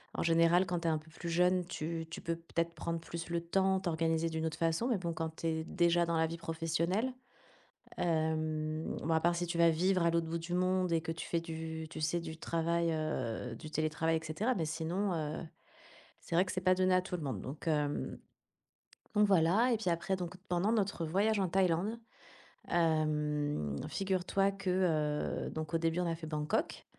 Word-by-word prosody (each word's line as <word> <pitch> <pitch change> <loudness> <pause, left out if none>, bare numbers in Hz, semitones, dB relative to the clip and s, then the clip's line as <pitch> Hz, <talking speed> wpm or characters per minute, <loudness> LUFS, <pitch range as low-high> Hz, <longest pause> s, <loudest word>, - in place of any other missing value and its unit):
en - - -1
général, 165 +2 +4
quand 175 0 -1
tu 170 - -2
es - - +4
un 155 - +1
peu 155 +1 -13
plus 170 +1 -6
jeune, 180 +2 +3
tu 165 -1 -4
tu - - -7
peux 165 0 -1
peut-être 170 0 -2
prendre 165 +1 -3
plus 165 0 -6
le 170 0 0
temps, 190 +2 +2
t'organiser 165 -1 +1
d'une 160 0 -2
autre 160 0 -4
façon, 165 +8 +1
mais 235 -5 +2
bon 170 -2 -3
quand 160 0 -4
tu 165 - -3
es 160 0 0
déjà 170 -1 +3
dans 165 -1 +1
la 160 - +3
vie 165 +1 -5
professionnelle, 170 +8 -1 0.8
hem, 155 -1 0
bon, 165 +1 +1
à 160 - +3
part 175 0 +3
si 175 0 -1
tu 170 0 -2
vas 170 0 +6
vivre 180 +2 +2
à 170 - +4
l'autre 165 -1 +1
bout 165 +1 -2
du 170 +2 -5
monde 185 -1 +2
et 165 -1 +2
que 165 -1 -3
tu 165 - -6
fais 170 - +1
du 160 -1 -5
tu 155 - -7
sais, 170 +3 +1
du 160 -1 -7
travail, 170 0 0
heu, 125 -7 -2
du 155 - -9
télétravail 155 +1 +1
et 160 - -7
cetera, 210 +11 0
mais 165 -4 0
sinon 175 +5 -1
heu, 155 -1 -2 0.8
c'est 165 - -4
vrai 180 - +6
que - - -4
c'est 185 - -2
pas 185 0 +4
donné 185 0 +3
à 185 - +4
tout 180 -1 -4
le 170 - -5
monde, 130 -10 -3
donc 145 +6 -7
hem, 150 -2 0 1.0
donc 210 0 +5
voilà 195 +7 +4
et - - +3
puis 210 -5 -1
après 170 +3 0
donc 180 0 -5
pendant 180 +5 +2
notre 200 -6 0
voyage 200 +6 +2
en 190 -2 +1
Thaïlande, 190 +5 +1 0.7
hem, 150 - +1
figure-toi 195 0 +1
que, 195 -1 -4 0.8
heu, - - -4
donc 155 0 -5
au - - +4
début 165 +1 +1
on 180 - +1
a 165 - 0
fait 160 -1 -8
Bangkok, 150 -1 -1
165 Hz, 210 wpm, -33 LUFS, 160-180 Hz, 1.0 s, vas